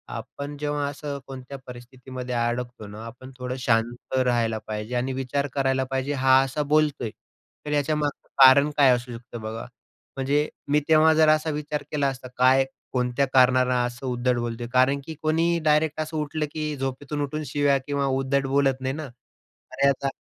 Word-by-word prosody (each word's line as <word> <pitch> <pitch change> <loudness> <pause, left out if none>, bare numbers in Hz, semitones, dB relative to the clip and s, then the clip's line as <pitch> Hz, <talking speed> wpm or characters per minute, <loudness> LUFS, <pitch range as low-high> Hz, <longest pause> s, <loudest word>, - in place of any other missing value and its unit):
आपण 145 +1 -7
जेव्हा 145 0 -2
असं 145 0 -6
कोणत्या 135 +1 -8
परिस्थितीमध्ये 125 0 -7
अडकतो 120 -1 -2
ना, 105 +2 -9
आपण 125 +3 -10
थोडं 125 0 -4
शांत 120 +1 0
राहायला 120 -3 +1
पाहिजे. 110 +3 -4
आणि 125 +2 -1
विचार 135 +2 -2
करायला 135 -1 +1
पाहिजे, 135 +2 -1
हा 130 -1 +5
असा 135 +3 -2
बोलतोय, 150 -6 +2 0.6
तर 150 - -4
याच्यामागचं 150 0 -1 0.2
कारण 140 +3 +7
काय 140 -2 +6
असू 125 0 -6
शकतं? 120 0 -9
बघा, 110 +1 -5 0.5
म्हणजे 145 +3 +1 0.2
मी 150 - +5
तेव्हा 160 0 +6
जर 155 0 +5
असा 155 +1 +3
विचार 150 0 -4
केला 145 -2 +1
असता 130 -1 -5
काय, 130 +1 +5 0.3
कोणत्या 125 +2 +1
कारणाने 130 -1 +5
असं 120 +2 -6
उद्धट 125 0 0
बोलतोय? 120 0 -3
कारण 130 +2 +4
की 160 - -7
कोणीही 165 +2 +2
डायरेक्ट 155 0 +2
असं 155 0 -4
उठलं 150 +1 -2
की 155 -1 -3
झोपेतून 135 +2 -3
उठून 150 +2 -3
शिव्या 140 +1 +2
किंवा 140 -1 0
उद्धट 135 +1 0
बोलत 135 -1 +1
नाही 130 0 -1
ना. 155 0 -5
अरे 125 +2 -5
आता 140 0 -1
135 Hz, 170 wpm, -25 LUFS, 125-145 Hz, 0.6 s, कारण